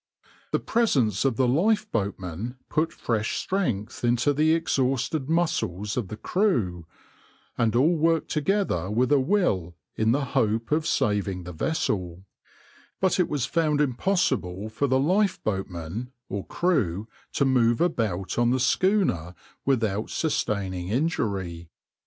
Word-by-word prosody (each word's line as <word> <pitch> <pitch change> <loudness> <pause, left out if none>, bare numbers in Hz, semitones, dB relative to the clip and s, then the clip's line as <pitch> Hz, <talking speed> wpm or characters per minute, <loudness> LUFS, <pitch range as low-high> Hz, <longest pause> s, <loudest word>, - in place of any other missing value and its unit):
The - - +2
presence 130 - +1
of 135 -4 +2
the 130 +2 +2
lifeboatmen 115 - 0
put 160 +1 +1
fresh 110 -2 -2
strength 125 - -2
into 120 +4 +2
the 155 +3 +3
exhausted 135 -1 0
muscles 105 - 0
of 120 -6 -2
the 105 - -7
crew, 110 - 0 0.7
and 115 -1 +1
all 150 +8 +4
worked 165 0 +1
together 150 - 0
with 120 +6 +1
a 145 - +5
will 130 - +1 0.2
in 110 +1 +2
the 140 +3 +1
hope 115 -3 0
of 155 +1 +1
saving 100 -3 0
the 90 - -7
vessel; 90 - -2 0.7
but 190 0 +2
it 180 - +2
was 145 -4 0
found 155 0 +1
impossible 125 - 0
for 130 +6 -1
lifeboatmen 125 - 0 0.2
or 100 -1 -4
crew 110 - 0 0.3
to 140 - +2
move 120 -3 +3
about 110 - 0
on 120 0 +3
the 130 +1 +2
schooner 130 - +1 0.3
without 110 -6 0
sustaining 95 - -1
injury. 100 - -2
120 Hz, 130 wpm, -26 LUFS, 100-155 Hz, 0.7 s, a